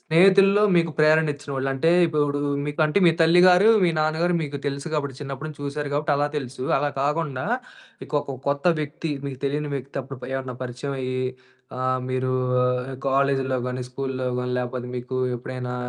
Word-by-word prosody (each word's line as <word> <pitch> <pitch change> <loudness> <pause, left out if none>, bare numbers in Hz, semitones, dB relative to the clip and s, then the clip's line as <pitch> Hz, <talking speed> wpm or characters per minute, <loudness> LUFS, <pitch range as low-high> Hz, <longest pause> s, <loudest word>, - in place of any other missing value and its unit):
స్నేహితుల్లో 195 +4 +5
మీకు 165 -1 +3
ప్రేరణిచ్చినవోళ్ళు 150 -3 +2
అంటే, 135 +5 +1 0.2
ఇపుడు 145 -2 0 0.3
మీకు 150 +2 -4
అంటే, 155 +5 +2
మీ - - +7
తల్లి 165 +2 +6
గారు, 180 +3 +6 0.2
మీ 180 - +4
నాన్న 155 0 +1
గారు 175 0 +2
మీకు 145 -1 -4
తెలుసు 140 +2 -3
గాబట్టి, 140 -3 -2
చిన్నప్పుడు 140 +1 -5
నుంచి 150 -2 -11
చూసారు 145 +1 -3
గాబట్టి 150 +1 0
అలా 145 +1 +1
తెలుసు. 130 -2 -5
అలా 145 - +1
కాకుండా 145 -2 -1 0.6
ఇకొక 140 -2 -3
కొత్త 140 0 -1 0.2
వ్యక్తి 155 +2 -4
మీకు 135 -2 -5
తెలీని 145 +1 -1
వ్యక్తి 135 0 -6
అప్పుడు 135 0 -9
ప - - -5
ఎవరన్నా 130 -1 -4
పరిచయమయ్యీ, 130 0 -4 0.6
ఆహ్, 130 0 0
మీరూ 130 0 -1 0.8
కాలేజ్‌లో 135 -1 +1
గానీ, 125 0 -3
స్కూల్లో 130 0 -3
గానీ, 125 0 -2
లేపోతే 125 0 -4
మీకు 125 +1 -5 0.2
ఎప్పుడైనా 125 0 -5
140 Hz, 160 wpm, -24 LUFS, 130-155 Hz, 0.8 s, మీ